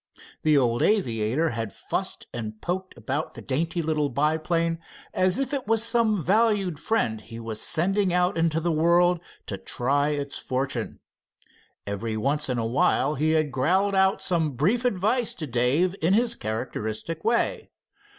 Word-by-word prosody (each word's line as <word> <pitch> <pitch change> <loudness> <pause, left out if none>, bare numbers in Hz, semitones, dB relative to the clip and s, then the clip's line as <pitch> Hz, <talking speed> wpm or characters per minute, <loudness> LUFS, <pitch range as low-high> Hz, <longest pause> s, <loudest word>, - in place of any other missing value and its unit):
The 155 -1 +4
old 120 -3 +2
aviator 130 - +1
had 115 -5 -4
fussed - - -4
and 110 -2 -5
poked 185 +5 -4
about 130 +7 -3
the - - -8
dainty 165 +5 -1
little 150 -2 0
biplane, 160 +4 0 0.3
as 185 0 +2
if 270 +1 -1
it 270 -6 -2
was 225 0 +2
some 230 -5 +2
valued 200 -3 +2
friend 135 - 0
he 115 +1 -9
was 115 -2 -5
sending 190 +3 +1
out 180 0 +2
into 165 -1 +1
the 170 +1 0
world 170 +2 +3 0.3
to 100 - -5
try 140 +9 +1
its 145 -2 -3
fortune. 130 -2 -3 0.8
Every 110 +2 -3
once 140 +5 0
in 125 - 0
a 115 - -1
while 130 +4 +2
he 155 +2 +1
had 155 -2 +1
growled 185 +10 +1
out 190 0 +2
some 165 -5 0
brief 200 - +1
advice 220 +2 +1
to 160 - -5
Dave 140 +9 +1
in 165 +4 +3
his 235 +1 +2
characteristic 110 +6 -4
way. 235 +2 0
155 Hz, 160 wpm, -25 LUFS, 125-185 Hz, 0.8 s, The